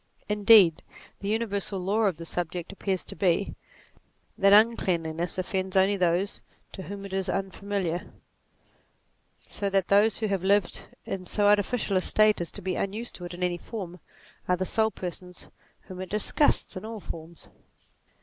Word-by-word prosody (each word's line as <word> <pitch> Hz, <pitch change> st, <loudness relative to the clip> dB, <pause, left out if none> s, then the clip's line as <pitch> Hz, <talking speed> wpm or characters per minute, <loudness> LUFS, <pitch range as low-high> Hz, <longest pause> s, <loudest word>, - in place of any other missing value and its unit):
Indeed 205 Hz, -5 st, +6 dB, 0.4 s
the 200 Hz, -, -5 dB
universal 205 Hz, -3 st, -1 dB
law 205 Hz, +5 st, +1 dB
of 185 Hz, -6 st, -1 dB
the 165 Hz, -, -7 dB
subject 175 Hz, +1 st, -4 dB
appears 195 Hz, -1 st, -2 dB
to -, -, -6 dB
be, 185 Hz, 0 st, +1 dB, 0.8 s
that 195 Hz, 0 st, +4 dB
un 220 Hz, +3 st, +7 dB
cleanliness 170 Hz, -2 st, -2 dB
offends 185 Hz, +1 st, -2 dB
only 190 Hz, +2 st, +4 dB
those 185 Hz, +1 st, 0 dB, 0.3 s
to 190 Hz, -, -8 dB
whom 200 Hz, +3 st, -7 dB
it 195 Hz, -, -8 dB
is 190 Hz, -1 st, -1 dB
unfamiliar, 195 Hz, -2 st, -2 dB
NATURE -, -, -8 dB
49 -, -, -25 dB, 1.3 s
so 200 Hz, -, -3 dB
that 195 Hz, -2 st, +1 dB
those 205 Hz, +2 st, +4 dB
who 220 Hz, -, -2 dB
have 195 Hz, -3 st, -1 dB
lived 200 Hz, -1 st, +1 dB, 0.2 s
in 185 Hz, -2 st, -5 dB
so 205 Hz, +3 st, +1 dB
artificial 205 Hz, 0 st, +2 dB
a -, -, +2 dB
state 215 Hz, 0 st, +3 dB
as 170 Hz, -, -2 dB
to -, -, -7 dB
be 185 Hz, -1 st, -1 dB
unused 215 Hz, +5 st, -3 dB
to 180 Hz, -, -8 dB
it 175 Hz, -, -7 dB
in 180 Hz, -, -5 dB
any 175 Hz, -1 st, 0 dB
form, 185 Hz, -5 st, -7 dB, 0.5 s
are 180 Hz, -, +2 dB
the 185 Hz, -, -1 dB
sole 220 Hz, +3 st, +2 dB
persons 180 Hz, -2 st, -8 dB, 0.3 s
whom 185 Hz, 0 st, -9 dB
it 185 Hz, -, -6 dB
disgusts 215 Hz, +8 st, +1 dB
in 185 Hz, -, -6 dB
all 220 Hz, 0 st, -6 dB
forms. 165 Hz, -3 st, -10 dB
190 Hz, 175 wpm, -27 LUFS, 180-205 Hz, 1.3 s, un